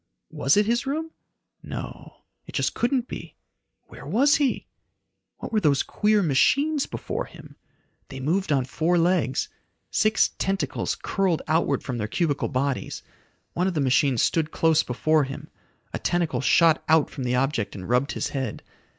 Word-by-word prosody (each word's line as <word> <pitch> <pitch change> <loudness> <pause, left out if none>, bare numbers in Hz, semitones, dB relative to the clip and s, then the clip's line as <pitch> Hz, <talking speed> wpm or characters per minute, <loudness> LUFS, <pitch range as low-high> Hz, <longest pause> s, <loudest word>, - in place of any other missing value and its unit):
Was 135 +8 +2
it 210 - +4
his 235 +4 0
room! 320 +4 -2 0.5
No - - -8 0.2
It - - -11
just - - 0
couldn't 250 0 0
be. - - -8 0.5
Where - - -13
was 280 +6 +4
he? 280 -4 0 0.7
What - - -8
were 215 - +4
those 145 -7 +2
queer 210 -1 +1
machines 280 - +2
before - - -4
him? - - -14 0.5
They 135 - -8
moved 160 +5 0
on 135 -3 +2
four 165 +6 0
legs. 170 -6 +1 0.4
Six 215 0 +2
tentacles 195 0 -1
curled 190 -5 0
outward 155 -4 +1
from 125 -3 -4
their 105 - -2
cubical 145 - 0
bodies. 135 0 -2 0.5
One 180 +2 0
of 185 - -2
the - - +1
machines 135 -1 +2
stood 160 -2 +1
close 160 -1 +3
before 155 +4 +1
him. 135 +1 -8 0.4
A - - -3
tentacle 175 -4 0
shot 165 +3 +4
out 160 -2 +4
from 135 - -6
the 125 0 0
object 135 -4 -1
and 95 -2 -7
rubbed 125 +4 +1
his - - -2
head. 130 -6 -4
160 Hz, 160 wpm, -25 LUFS, 135-195 Hz, 0.7 s, it